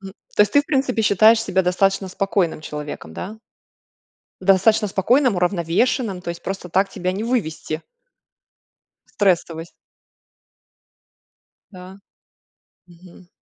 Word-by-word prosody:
Мгм, 195 -1 -10 0.2
то - - +6
есть 210 - -1
ты, 285 - +6
в - - -29
принципе, 265 -5 0
считаешь 215 +2 +5
себя 190 -4 0
достаточно 195 +2 +1
спокойным 185 -3 -1
человеком, 150 - -7
да? 195 - -7 1.0
Достаточно 195 +3 +3
спокойным, 235 +5 +2
уравновешенным, 180 - 0
то 175 - -6
есть 170 - -7
просто 195 -2 -5
так 190 +3 +1
тебя 185 -1 -3
не 195 +4 -4
вывести. 165 -9 -2 1.3
В - - -27
стрессовость. 170 -4 0 2.0
Да. 185 0 -12 0.9
Мгм. 175 0 -17
190 Hz, 115 wpm, -21 LUFS, 175-210 Hz, 2.0 s, то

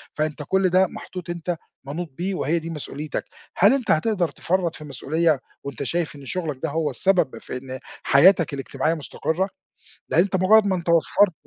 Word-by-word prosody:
فأنت 155 0 -2
كل 190 -1 +3
ده 185 +1 +4
محطوط 180 0 -8
أنت 175 0 -3 0.3
منوط 160 +5 -4
بيه، 190 +2 -2
وهي 170 -1 0
دي 165 +1 -7
مسؤوليتك، 150 -1 -5 0.3
هل - - +6
أنت 270 -4 0
هتقدر 175 +1 +2
تفرّط 175 +3 -1
في 155 - -9
مسؤولية، 150 +2 0 0.2
وأنت 140 -1 -5
شايف 165 +2 -2
إن 140 -1 -11
شغلَك 155 -3 -3
ده 160 - 0
هو 155 0 0
السبب 175 -1 +2
في - - -6
إن 130 0 -7 0.2
حياتَك 170 +2 +5
الاجتماعية 135 +3 -1
مُستقرة؟ 165 +4 -2 0.6
لأن - - +4
أنت 190 +1 0
مجرد 205 +4 +5
ما 190 - +2
أنت 175 -1 -4
وفّرت 170 +3 +4
165 Hz, 180 wpm, -23 LUFS, 150-185 Hz, 0.6 s, هل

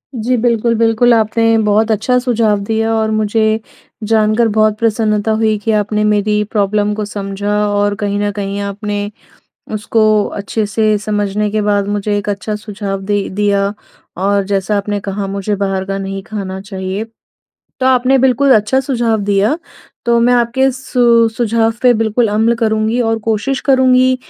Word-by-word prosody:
जी, 245 +2 0
बिल्कुल-बिल्कुल। 230 0 +2
आपने 225 0 +2
बहुत 215 +2 +2
अच्छा 225 +4 +1
सुझाव 230 -5 +1
दिया 225 +2 -1
और 220 -1 0
मुझे 215 +1 +1 0.4
जानकर 220 +1 +2
बहुत 215 -1 +3
प्रसन्नता 220 -1 0
हुई 220 -1 +1
कि 220 +2 -1
आपने 210 0 0
मेरी 210 0 +1
प्रॉब्लम 210 0 0
को 210 0 -3
समझा 200 0 -4
और 205 0 0
कहीं 205 0 -2
न 205 0 0
कहीं 200 0 -4
आपने 205 +1 -4 0.6
उसको 215 +1 0 0.4
अच्छे 210 +2 -2
से 215 0 +1
समझने 210 0 -1
के 215 0 0
बाद 205 -1 0
मुझे 205 0 -1
एक 205 0 -4
अच्छा 205 +1 -3
सुझाव 205 -2 -5
दे 205 -1 0
दिया। 200 0 0 0.4
और 200 +1 +1
जैसा 200 +1 -1
आपने 205 0 -2
कहा 200 0 -4
मुझे 200 +1 -2
बाहर 195 -1 -2
का 195 0 -3
नहीं 195 0 -5
खाना 190 -1 -6
चाहिए 195 +1 -5 0.7
तो 260 - 0
आपने 260 +1 +3
बिल्कुल 265 +1 +3
अच्छा 215 +5 +2
सुझाव 235 -5 0
दिया। 205 +9 +1 0.5
तो 235 0 +3
मैं 245 +1 +3
आपके 245 +3 +2
सु 240 -3 +2
सुझाव 225 -1 +1
पे 250 -1 +5
बिल्कुल 225 +1 +1
अमल 225 +3 +2
करुँगी 220 +1 0
और 225 -1 0
कोशिश 225 +5 -1
करुँगी 255 -1 +4
215 Hz, 160 wpm, -15 LUFS, 205-230 Hz, 0.7 s, पे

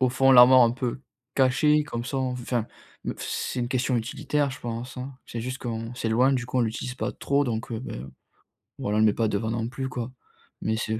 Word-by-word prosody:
au 130 - +4
fond 135 +1 +4
l'armoire 125 0 +9
un 115 - +5
peu 125 +1 -3 0.4
caché 150 +3 +4
comme 120 -5 -4
ça 135 +2 -3
on 130 -1 0
enfin, 120 -2 -2 0.4
me - - -1
c - - -21
c'est 125 - -3
une 120 - -1
question 125 0 +1
utilitaire 145 +4 -1
je 130 - -8
pense, 120 +2 -5
hein. 130 +2 -5
C'est 115 - -5
juste 130 +2 -4
qu'on 115 0 -4
s'éloigne, 125 +3 +2
du 120 -2 -2
coup 130 - -4
on - - +4
l'utilise 115 +2 -3
pas - - -3
trop 140 +1 +1
donc, 115 -3 -3
heu, 115 - -2
beh, 125 - -6 0.8
voilà 105 +1 -1
on - - +3
le 110 - +5
met 105 - +3
pas 115 +1 +1
devant 110 +1 -1
non 115 0 -1
plus 130 +1 -4
quoi. 125 -1 -4 0.5
Mais 110 0 0
c'est 110 0 -2
125 Hz, 235 wpm, -26 LUFS, 115-130 Hz, 0.8 s, l'armoire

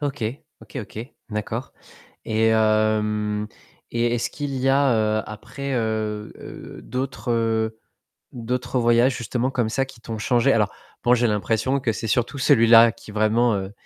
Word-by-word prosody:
OK. 145 -3 -3 0.4
OK, - - -12
OK. - - -11 0.3
D'accord 110 +4 -4 0.5
et 110 +1 +1
hem 110 -1 +1 0.4
et 120 0 +1
est-ce 120 - -1
qu'il 145 -2 -4
y 130 0 0
a, 115 -6 +2
heu, - - -8
après, 125 +6 -6
heu, 110 -2 -4
d'autres, 125 -1 -4
heu, 110 -1 0 0.5
d'autres 125 +2 -2
voyages 120 +2 +4
justement 125 +2 -2
comme 125 -4 0
ça 135 +3 0
qui 130 -3 -15
t'ont 115 -1 -6
changé? 120 +2 +2
Alors - - +2 0.3
bon 120 +1 +5
j'ai 120 0 +2
l'impression 110 +6 0
que 120 -3 0
c'est 115 - -5
surtout 120 +5 0
celui-là 115 -3 +6
qui 115 -1 -14
vraiment, 110 +2 +2
heu, 95 0 -5
115 Hz, 150 wpm, -23 LUFS, 110-125 Hz, 0.5 s, celui-là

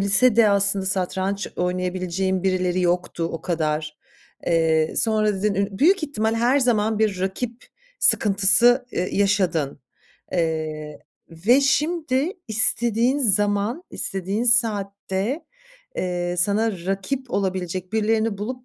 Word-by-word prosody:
lisede 215 +3 +4
aslında 200 -1 +1
satranç 190 +1 -2
oynayabileceğim 185 +1 -1
birileri 185 -1 0
yoktu 175 -1 -1
o 165 - -5
kadar." 155 -3 -2 0.5
Eee, 160 -2 +2
sonra 215 -2 +2
dedin 200 +1 -1
ün 200 0 -2
büyük 360 +4 +4
ihtimal 225 -7 -1
her 240 +4 +2
zaman 220 -3 +1
bir 205 -4 0
rakip 230 +5 -4 0.3
sıkıntısı, 210 +5 +4
eee, 180 - -2
yaşadın. 185 -10 0 0.5
Eee, 155 -3 -2 0.3
ve 210 +12 +3
şimdi 300 +1 0 0.2
istediğin 235 +3 +1
zaman, 205 - +1
istediğin 195 +4 -3
saatte, 210 - 0 0.5
eee, 175 -1 -2
sana 210 +5 +1
rakip 200 +7 -3
olabilecek 185 -1 -3
birilerini 220 -1 0
bulup 250 +4 -5
200 Hz, 110 wpm, -22 LUFS, 180-230 Hz, 0.5 s, lisede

